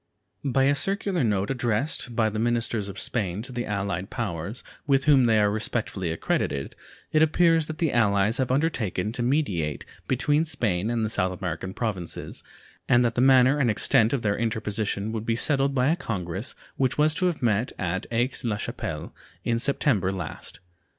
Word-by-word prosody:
By 135 -1 +2
a 140 +1 +4
circular 195 +1 0
note 105 -2 0
addressed 120 +1 -1
by 110 -1 +2
the 110 - -3
ministers 115 -2 0
of 100 -1 -7
Spain 100 -3 -2
to 130 - -8
the 120 -1 -3
allied 100 -2 -2
powers, 105 -2 -4 0.2
with 135 -1 +3
whom 135 -5 +5
they 110 -1 +4
are 105 -1 +3
respectively 105 -4 -2
accredited, 70 -3 -2 0.4
it 155 - +3
appears 165 0 +4
that 155 - -5
the 160 -4 0
allies 105 0 +2
have 130 - +1
undertaken 120 - 0
to 120 - -3
mediate 105 - 0 0.2
between 145 +4 +2
Spain 110 - -1
and 115 -2 0
the - - -1
South 90 -2 0
American 95 0 -4
Provinces, 100 -8 -4 0.5
and 120 0 +5
that 115 - +1
the 120 - +1
manner 130 +2 +5
and 130 -4 +3
extent 110 +1 +3
of 135 -4 -1
their 100 -1 0
interposition 110 -2 -2
would 110 -1 -3
be 115 0 0
settled 140 +2 +1
by 130 +1 +3
a 165 - +3
congress 100 - -4 0.2
which 130 -2 +1
was 150 +1 +4
to 180 +3 +1
have 170 -7 -2
met 110 +1 +1
at 95 +2 -2
Aix 120 +3 0
la 110 -4 -1
Chapelle - - -5 0.3
in 115 -1 0
September 120 -7 +1
last. 85 -6 -6
115 Hz, 180 wpm, -26 LUFS, 100-135 Hz, 0.5 s, whom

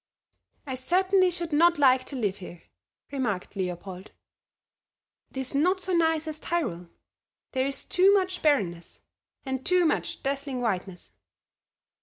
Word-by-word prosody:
"I 265 - -4
certainly 370 +8 +2
should 345 -2 -4
not 340 +3 +5
like 260 -3 +4
to 280 - -7
live 205 -6 -1
here," 175 -3 -11 0.5
remarked 220 -10 -3
Leopold; 185 0 -5 1.2
"it - - -12
is 265 0 -3
not 360 +7 +2
so 370 0 -2
nice 320 -2 +2
as 310 -1 -5
Tyrol; 235 - -2 0.6
there 260 0 0
is 275 - -5
too 375 +2 +4
much 370 -2 +1
barrenness, 185 - 0 0.4
and 265 -1 -3
too 365 +2 +3
much 315 - -1
dazzling 275 -1 -2
whiteness." 190 -6 -3
275 Hz, 135 wpm, -27 LUFS, 210-345 Hz, 1.2 s, not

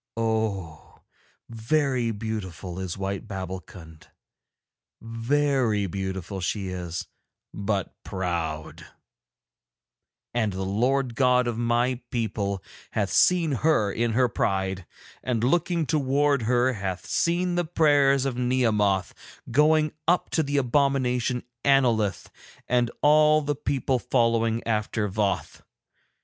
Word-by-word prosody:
Oh! 110 -8 -3 0.4
very 125 +1 0
beautiful 100 -5 -5
is 95 -1 -4
white 100 +2 -4
Babbulkund, 95 -4 -8 0.9
very 115 -1 0
beautiful 95 0 -4
she 95 +2 -2
is, 90 -2 -5 0.5
but 100 -1 -2
proud; 85 -4 -4 1.5
and 110 -4 0
the 95 +1 -3
Lord 125 +7 +1
the - - -12
God 125 0 +3
of 120 -1 -2
my 120 +2 +1
people 100 -5 -2 0.3
hath 100 -3 -1
seen 175 -4 +4
her 135 -6 +2
in 115 0 0
her 125 +2 +3
pride, 95 -4 -2 0.3
and 120 -3 -1
looking 170 +4 +1
towards 140 -3 +1
her 125 +2 +2
hath 95 -4 -4
seen 175 +1 0
the 175 0 +1
prayers 145 -5 +3
of 135 -3 -1
Nehemoth 110 -7 +1 0.4
going 155 +3 +4 0.2
up 175 +2 +2
to 160 - +2
the 145 -1 -1
abomination 125 -2 +1 0.2
Annolith 120 -7 +2 0.4
and 120 -1 +2
all 155 +1 +5
the 145 +1 0
people 135 -2 -1
following 115 -2 +1
after 105 -1 -1
Voth. 100 0 -2
115 Hz, 110 wpm, -25 LUFS, 100-135 Hz, 1.5 s, all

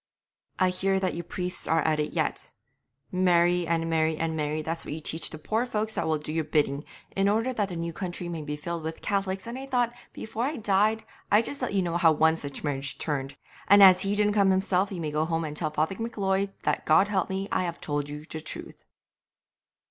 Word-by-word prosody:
'I 185 -1 +3
hear 190 +1 +1
that 185 -1 0
you 170 - -3
priests 180 +1 -4
are 165 -1 +2
at 155 -1 +1
it 150 0 -1
yet. 155 -5 -2 0.6
"Marry 175 -1 +3
and 165 0 0
marry 160 -1 +1
and 160 0 -1
marry," 155 0 -1
that's 165 +1 -3
what 150 - -5
ye - - -5
teach 160 +1 -1
the 155 - -8
poor 220 +9 -1
folks 220 -3 -2
that - - -1
will 160 -1 +2
do 150 +1 -6
your 160 0 0
bidding, 145 -2 0 0.3
"in 195 +1 +3
order 225 +5 +1
that 205 -4 -1
the 175 - -5
new 170 0 -3
country 175 0 -5
may 170 -2 -4
be 150 0 -4
filled 170 +3 -4
with 160 +1 -6
Cath'lics," 195 -1 -1
and 235 +3 -5
I 270 - -7
thought 245 -3 +1 0.2
before 225 +2 -4
I 295 +4 -2
died 215 -1 +2 0.3
I'd 210 +3 +5
just 285 - -4
let 250 - -2
ye 190 - +3
know 170 -1 -1
how 165 -2 +5
one 160 +1 +4
such 140 -4 -6
marriage 140 -2 -2
turned; 140 -3 -3 0.3
and 200 0 +8
as 185 -1 +8
he 200 +1 0
didn't 210 0 +2
come 200 -2 +4
himself 190 +1 +2
you 180 -3 -4
may 155 -2 -2
go 150 +1 +1
home 165 0 -1
and 150 -1 -5
tell 155 0 -1
Father 155 +4 0
M'Leod 200 -4 -1
that, - - -1
God 155 +6 +5
helping 190 -1 -1
me, - - -6
I - - +2
have 170 -1 -4
told 145 -1 -2
you 150 +1 -7
the 160 0 -6
truth.' - - -8
175 Hz, 230 wpm, -27 LUFS, 155-200 Hz, 0.6 s, and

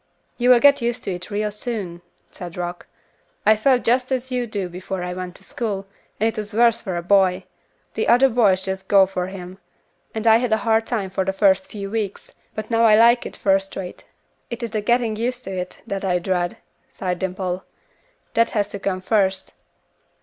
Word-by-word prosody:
"You 245 +1 +3
will 250 -1 +8
get 285 +1 +5
used 235 0 -2
to 195 - -2
it 180 0 -7
real 210 0 -1
soon," 205 -6 -5 0.3
said 175 -1 -9
Rock. 175 0 -5 0.6
"I 215 - +6
felt 250 +3 +2
just 250 +2 +1
as 260 0 -2
you 250 -1 -1
do 200 -4 -3
before 180 +1 -5
I 180 0 -3
went 180 0 -6
to - - -16
school, 205 -5 -3 0.3
and 220 - +3
it 225 - -2
is 210 0 -4
worse 235 0 +4
for 185 -4 -3
a 170 - -4
boy; 190 0 +3 0.5
the - - -1
other 245 +3 +6
boys 210 -7 +3
just 190 0 -4
go 195 -1 +6
for 185 -1 -3
him, 185 0 -9 0.6
and 220 0 -3
I 225 0 +7
had 245 -1 -1
a - - +4
hard 225 0 +2
time 200 -6 -2
for 190 0 0
the 190 +1 -1
first 190 -2 +3
few 200 -2 -6
weeks, 215 -3 -4 0.2
but 215 +1 -5
now 230 0 +3
I 215 -1 +7
like 235 +2 +5
it - - -11
first 195 0 +1
rate." 180 -2 -7 0.5
"It 235 +1 -5
is 230 - -3
the 215 -2 -1
getting 235 0 +1
used 245 +2 -2
to 190 0 -5
it, 180 0 -5
that 195 0 -4
I 180 -2 +1
dread," 175 0 -1 0.3
sighed 180 -2 -3
Dimple; 185 -1 -3 0.7
"that 230 0 +3
has 205 0 +1
to 200 - -6
come 190 -1 -2
first." 190 -1 0
200 Hz, 210 wpm, -22 LUFS, 185-230 Hz, 0.7 s, will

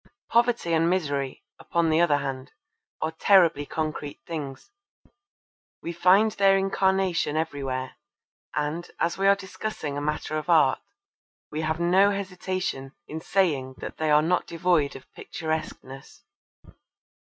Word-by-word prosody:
Poverty 235 -7 +2
and 165 +1 +3
misery, 145 -7 -1 0.2
upon 170 -1 0
the 160 +2 +3
other 150 -4 +4
hand, 135 -2 -5 0.5
are 160 - -1
terribly 165 -4 +4
concrete 155 -2 -4
things. 145 - -6 1.1
We 170 - -4
find 185 +6 +4
their 195 -2 +4
incarnation 190 -4 +1
everywhere 135 -5 -3 0.6
and, 150 +3 -2
as 170 +2 0
we 195 - +3
are 200 - +6
discussing 190 -6 -5
a - - -2
matter 150 +1 -2
of 155 - -9
art, 155 -6 +4 0.7
we 155 - -3
have 160 +1 -1
no 185 +4 +4
hesitation 185 -7 -3
in 160 +1 -6
saying 145 -10 0
that - - -8
they 155 -1 -1
are 150 0 +5
not 175 +2 +1
devoid 165 -4 +1
of 135 - -10
picturesqueness. 155 -4 -6
160 Hz, 130 wpm, -26 LUFS, 145-185 Hz, 1.1 s, are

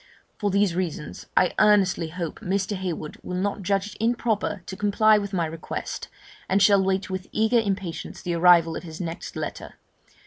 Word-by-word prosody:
For 205 - +1
these 200 -2 +2
reasons, 170 -4 -4
I 185 - +4
earnestly 195 -5 +4
hope 170 0 -5
Mr. 195 0 -1
Heywood 175 -5 -4
will 180 - -4
not 200 +2 -1
judge 195 +2 -1
it - - -6
improper 225 -4 0
to - - -6
comply 210 +1 +4
with 200 -1 -5
my 175 -4 0
request, 160 +1 -5 0.4
and 195 - +3
shall 200 0 +5
wait 190 +1 -1
with 185 0 -4
eager 220 +2 +3
impatience 195 -6 -3
the 175 - -1
arrival 170 -1 +5
of - - -4
his 160 -2 -9
next 170 0 -5
letter. - - -6
190 Hz, 175 wpm, -25 LUFS, 175-205 Hz, 0.4 s, shall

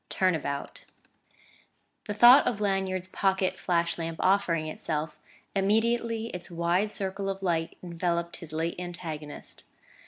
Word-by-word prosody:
X - - -5
TURN 185 -1 +4
ABOUT 140 -3 -4 1.2
The 210 - -3
thought 240 +6 +8
of 225 -4 0
Lanyard's 190 -2 0
pocket 190 0 0
flash 170 -1 0
lamp 165 0 -3
offering 180 -4 +2
itself, 155 0 -4 0.4
immediately 225 +3 +1
its 180 -3 -7
wide 175 +4 +1
circle 195 -1 -3
of 195 0 -4
light 165 -3 -1
enveloped 170 0 -2
his 165 -2 -11
late 165 +2 -2
antagonist. 160 -4 -7
180 Hz, 130 wpm, -28 LUFS, 165-195 Hz, 1.2 s, thought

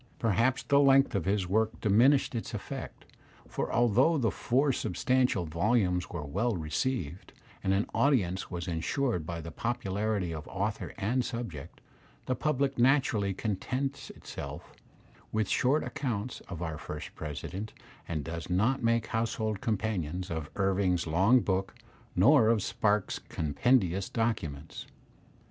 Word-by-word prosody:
Perhaps 115 +4 +1
the 140 - +4
length 135 -1 +5
of 100 -6 -1
his 100 0 +1
work 110 +4 +1
diminished 120 +8 +4
its 115 - -4
effect, - - -7 0.4
for - - -3
although 120 +8 +4
the 115 -7 +1
four 135 +7 +1
substantial 120 -1 +1
volumes 90 +2 +1
were 80 -4 -5
well 100 +10 0
received, 85 - -3 0.3
and 95 - +1
an 95 +2 +2
audience 100 -10 +1
was 85 -1 -5
ensured 90 - -1
by 85 -1 -4
the 80 0 -7
popularity 100 -3 -1
of 80 -1 -7
author 105 +2 -3
and 115 +5 0
subject, 115 - -6 0.4
the 130 - 0
public 140 0 0
naturally 120 -6 +3
contents 130 +8 -3
itself - - -8 0.6
with 110 -1 0
short 140 +5 +2
accounts 120 -3 -3
of 85 -2 -5
our 80 -3 -4
first - - -7
President, 90 +8 -6 0.4
and 80 -4 -2
does 85 +3 -6
not 110 +9 +2
make 115 -1 +2
household 110 -2 -2
companions 95 -5 -2
of 80 -2 -4
Irving's 95 -3 +1
long 95 +10 +4
book 95 -1 -1 0.4
nor 115 +5 +6
of 110 -4 +2
Spark's 105 -2 0
compendious 95 - +1
documents. 80 -11 -3
105 Hz, 135 wpm, -30 LUFS, 90-120 Hz, 0.6 s, nor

